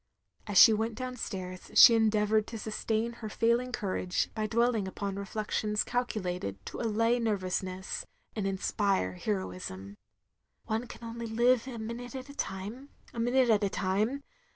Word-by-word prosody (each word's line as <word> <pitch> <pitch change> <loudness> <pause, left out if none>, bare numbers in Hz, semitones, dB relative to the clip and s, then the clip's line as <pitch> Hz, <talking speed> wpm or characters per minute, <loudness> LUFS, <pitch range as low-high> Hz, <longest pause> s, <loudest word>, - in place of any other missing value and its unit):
As 205 -2 0
she 225 - +10
went 220 +1 -1
down 255 +1 -5
stairs 185 -5 -6
she 235 - +10
endeavoured 215 -1 +3
to 230 - -6
sustain 220 +1 -2
her 215 - -4
failing 235 +4 +1
cotirage 185 -5 -1
by 215 -1 -1
^dwelling 230 -2 +1
upon 195 +1 -4
reflections 210 +1 -1
calculated 180 - -2
to - - -6
allay 230 +1 +2
nervousness, 190 - -2 0.3
and 205 -3 -1
inspire 195 - 0
heroism. 95 0 -4 0.7
"One 225 +3 -2
can 235 - -11
only 230 0 -5
live 240 +2 +3
a 250 -3 -6
minute 235 +3 -6
at 260 +1 -7
a 280 - -10
time 215 +5 -5
— - - -25
a. 235 - -5
minute 245 +1 +3
at 210 -1 +3
a 200 - +2
time. 205 +9 0
220 Hz, 155 wpm, -30 LUFS, 195-235 Hz, 0.7 s, she